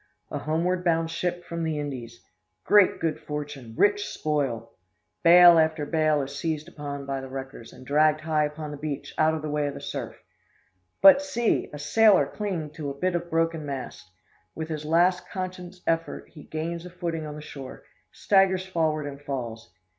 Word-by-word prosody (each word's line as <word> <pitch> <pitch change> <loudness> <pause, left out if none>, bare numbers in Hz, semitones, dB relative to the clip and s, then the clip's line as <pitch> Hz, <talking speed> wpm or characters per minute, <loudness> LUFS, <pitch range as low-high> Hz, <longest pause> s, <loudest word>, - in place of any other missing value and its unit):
A - - -3
homeward 175 +4 0
bound 165 -2 +1
ship 175 +1 -3
from 170 0 -4
the 160 -2 -1
Indies! 125 -5 -6 0.4
Great 205 -2 +5
good 160 -1 -1
fortune 145 -6 -6
rich 205 0 +3
spoil! 135 -7 -2 0.5
Bale 175 0 +8
after 160 -1 +1
bale 155 -1 +2
is 140 +1 -7
seized 155 0 -3
upon 140 -1 -6
by 135 -1 -3
the 135 - -8
wreckers, 130 -3 -8
and 130 - -14
dragged 155 +2 +3
high 155 -1 +1
upon 150 0 -6
the 145 - -6
beach 145 -1 -5
out 160 +1 +4
of 155 - -5
the 155 - -3
way 150 -1 0
of 140 - -5
the - - -6
surf. - - -5 0.9
But, 285 -1 +9
see! 240 -5 0
a 150 - -7
sailor 210 +7 +4
clinging 180 -8 -4
to 150 -1 -5
a 140 - -7
bit 185 +4 0
of 175 0 -3
broken 165 -1 0
mast! 135 -9 -6 0.5
With 160 0 -5
his 155 -1 -4
last 175 +3 +2
conscious 185 -1 -6
effort 165 0 -2
he 150 -3 -13
gains 165 +2 -4
a 180 - -8
footing 170 -3 -4
on 150 - -7
the 150 - -8
shore, 135 -3 -9 0.3
staggers 190 -2 +2
forward, 160 -5 0
and 140 -1 -7
falls. 120 -6 -5
155 Hz, 185 wpm, -26 LUFS, 145-175 Hz, 0.9 s, But